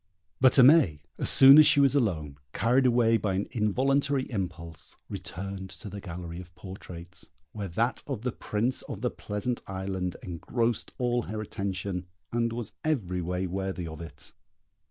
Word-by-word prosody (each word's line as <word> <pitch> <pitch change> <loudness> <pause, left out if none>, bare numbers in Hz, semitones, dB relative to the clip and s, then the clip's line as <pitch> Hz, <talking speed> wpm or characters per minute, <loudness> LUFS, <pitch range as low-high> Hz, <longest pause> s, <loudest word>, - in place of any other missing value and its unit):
But 130 -1 +6
Aimée, 125 - +6 0.2
as - - 0
soon 135 +3 +9
as 155 - +8
she 155 -2 +5
was 140 -1 +5
alone, 80 - -1
carried 125 +3 +3
away 115 -2 +4
by 100 -3 -1
an 100 - -1
involuntary 135 +5 +1
impulse, 85 -6 -6
returned 95 +1 -6
to 100 - -10
the 100 - -7
gallery 85 -1 -7
of 90 -1 -16
portraits, 90 +1 -10 0.2
where 100 -2 -5
that 115 +8 -1
of 130 -6 -4
the 125 - -1
Prince 115 +3 -1
of - - -6
the - - 0
Pleasant 105 +4 -4
Island 95 -1 -3
engrossed 115 +6 -2
all 120 -1 +1
her 110 +1 -4
attention, 95 -3 -4 0.2
and 115 0 0
was 115 -2 -5
every 100 - -1
way 90 +2 -2
worthy 95 -1 -3
of 80 0 -8
it. 75 -4 -10
100 Hz, 160 wpm, -28 LUFS, 90-120 Hz, 0.2 s, soon